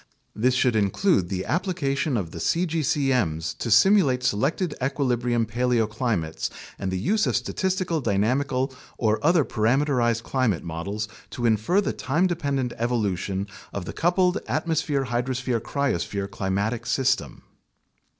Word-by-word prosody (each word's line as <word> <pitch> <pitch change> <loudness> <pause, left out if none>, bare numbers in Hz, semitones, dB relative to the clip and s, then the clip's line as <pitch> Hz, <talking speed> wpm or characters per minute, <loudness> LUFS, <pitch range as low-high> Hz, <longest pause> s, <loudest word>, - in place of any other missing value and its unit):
This 125 +4 +2
should 125 -2 +2
include 105 - +2
the 95 -1 -3
ap 180 +4 0
plication 140 -6 0
of 85 -5 -5
the - - -7
cgcm's 135 - 0
to 120 - -5
simulate 130 - +5
selected 145 - 0
equilibrium 125 -3 0
paleoclimates 110 -6 -1 0.3
and 95 - -2
the 95 - -1
use 210 - +1
of - - +1
statistical 185 -4 -1
dynamical 130 +5 0 0.2
or 110 +1 +1
other 165 -2 +4
parameterized 120 0 +1
climate 120 -10 0
models 100 +6 -4 0.2
to 120 - -4
infer 115 - +3
the - - -2
time 155 +8 0
dependent 140 -8 -1
evolution 100 -5 -1 0.3
of 100 -3 -5
the - - -6
coupled 180 +2 +2
atmosphere 155 -4 0
hydrosphere 125 0 -1
cryosphere 105 -7 -1
climatic 105 +5 -2
system. 130 -1 0
125 Hz, 130 wpm, -25 LUFS, 105-145 Hz, 0.3 s, simulate